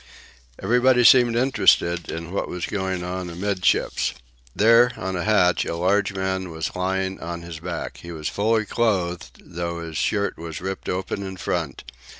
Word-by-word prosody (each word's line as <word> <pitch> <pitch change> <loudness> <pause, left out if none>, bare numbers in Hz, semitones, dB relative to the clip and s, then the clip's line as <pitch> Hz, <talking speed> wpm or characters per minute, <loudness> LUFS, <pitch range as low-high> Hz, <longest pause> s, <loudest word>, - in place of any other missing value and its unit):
Everybody 125 +1 +3
seemed 120 -1 +6
interested 90 -9 +3
in 85 +1 -5
what 100 - -2
was 90 -1 -4
going 95 -3 -2
on 90 0 -4
amid 95 +2 -3
ships. - - +1 0.4
There, 115 +3 +5
on 95 0 -3
a 90 - -2
hatch, 100 -5 +3
a - - -3
large 95 +3 +1
man 95 -1 -2
was 80 -1 -4
lying 95 +1 -1
on 85 0 -6
his 85 -2 -8
back. 85 - -5
He 85 - -9
was 80 -2 -5
fully 110 +1 +1
clothed, 95 -7 -1
though 85 0 -5
his 80 -2 -6
shirt 100 +5 0
was 80 -2 -6
ripped 95 +1 -5
open 95 +2 -3
in 95 -1 -6
front. 85 -6 -3
95 Hz, 165 wpm, -23 LUFS, 85-100 Hz, 0.4 s, seemed